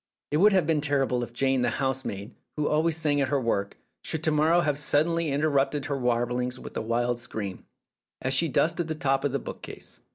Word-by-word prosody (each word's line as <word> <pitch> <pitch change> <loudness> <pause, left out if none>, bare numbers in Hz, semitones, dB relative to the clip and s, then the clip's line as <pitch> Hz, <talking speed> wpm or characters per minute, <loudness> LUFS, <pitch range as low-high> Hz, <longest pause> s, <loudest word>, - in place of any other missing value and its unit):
It 150 - +2
would 205 +6 +6
have 185 -4 +3
been 155 -2 +1
terrible 135 -4 +1
if 120 - -5
Jane, 130 +1 +1
the - - +2
housemaid, 130 -6 -3 0.2
who 150 - 0
always 160 +1 +2
sang 150 -3 +1
at 135 - +1
her 140 +1 +1
work, 100 -5 -1 0.2
should 160 -1 -3
to 160 - +2
morrow 155 +3 +4
have 145 -3 0
suddenly 160 +3 +1
interrupted 140 -1 +1
her 145 - -2
warblings 125 0 -1
with - - -10
a - - -1
wild 120 +2 0
scream, 100 -5 -5 0.5
as 130 +1 0
she 165 +5 +3
dusted 165 +4 +1
the 160 - -2
top 135 -2 0
of 145 - +1
the 140 - 0
bookcase. - - -9
140 Hz, 205 wpm, -27 LUFS, 125-155 Hz, 0.5 s, would